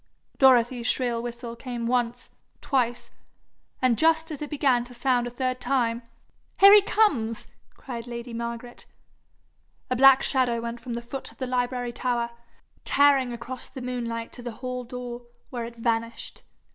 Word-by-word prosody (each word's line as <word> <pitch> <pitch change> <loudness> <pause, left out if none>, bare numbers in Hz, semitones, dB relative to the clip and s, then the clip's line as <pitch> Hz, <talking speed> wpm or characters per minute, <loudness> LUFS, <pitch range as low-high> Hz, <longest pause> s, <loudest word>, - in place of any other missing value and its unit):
Dorothy's 245 -2 +4
shrill 240 -3 0
whistle 235 0 -6
came 240 -1 -5
once, 245 0 -1 0.3
twice 245 -3 -1 0.7
and 245 -3 +3
just 320 0 +3
as 300 - -6
it 295 - -4
began 270 -5 +2
to 245 0 -11
sound 245 0 +1
a - - -3
third 255 +1 -2
time, 245 -3 0 0.6
'Here 395 +1 +10
he 415 - +9
comes!' 280 - +1 0.3
cried 240 -2 -7
lady 235 0 -6
Margaret. 235 +1 -6 1.0
A - - +3
black 270 +1 +7
shadow 250 -3 +1
went 235 +1 -5
from 245 -2 -5
the 235 - -5
foot 265 +3 -6
of - - -21
the 260 - -3
library 245 -1 -1
tower, 235 -1 -1 0.5
tearing 275 -3 +4
across 240 +2 -7
the - - -8
moonlight 235 -2 -4
to - - -9
the 240 -1 -6
hall 250 +1 -5
door, 245 -1 -7 0.2
where 240 -3 -3
it 235 0 -9
vanished. 230 0 -2
245 Hz, 160 wpm, -26 LUFS, 235-260 Hz, 1.0 s, Here